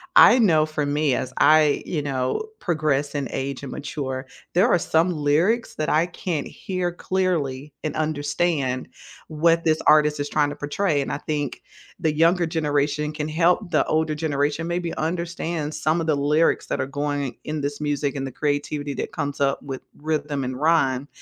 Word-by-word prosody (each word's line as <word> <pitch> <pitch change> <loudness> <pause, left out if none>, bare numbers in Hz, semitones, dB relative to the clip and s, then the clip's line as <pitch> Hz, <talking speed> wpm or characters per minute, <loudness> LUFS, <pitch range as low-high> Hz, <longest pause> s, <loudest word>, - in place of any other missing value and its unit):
I 255 - +8
know 160 -8 +4
for 155 -2 -2
me 145 -2 +1
as 130 - -3
I, 155 -1 +5
you 155 -4 -2
know, 135 - -2
progress 150 -4 0
and 140 -4 -2
age 140 0 -4
and 135 - -6
mature, 135 -2 -4 0.3
there 190 +7 +4
are 180 - +4
some 165 +1 +2
lyrics 165 +10 +1
that 155 - -2
I 160 +3 +3
can't 170 -3 -3
hear 185 -2 -3
clearly 155 -7 -2
and 155 - -3
understand 145 -3 -1 0.4
what 165 +2 +2
this 155 -1 +2
artist 150 -1 +5
is 145 - -1
trying 145 -1 +2
to 145 - -6
portray, 145 +1 0
and - - -3
I - - -1
think 150 -3 -3 0.4
the 160 -3 +1
younger 170 +3 +3
generation 150 -1 0
can 150 0 -3
help 175 +4 +2
the - - +3
older 155 -1 0
generation 150 +1 -1
maybe 170 -1 -2
understand 165 -2 -3
some 155 +2 +1
of 160 - -3
the 155 - +3
lyrics 150 +3 +2
that - - -1
are 130 - -2
going 145 -2 -3
in 155 -1 -3
this 145 +1 -3
music 145 -1 -1
and 135 0 -3
the 135 - -5
creativity 145 0 -2
that - - -4
comes 145 -2 -3
up 140 -1 +1
with 135 -2 -6 0.2
rhythm 150 -2 -2
and 130 +1 -4
rhyme, 145 -4 +2
150 Hz, 180 wpm, -23 LUFS, 145-165 Hz, 0.4 s, I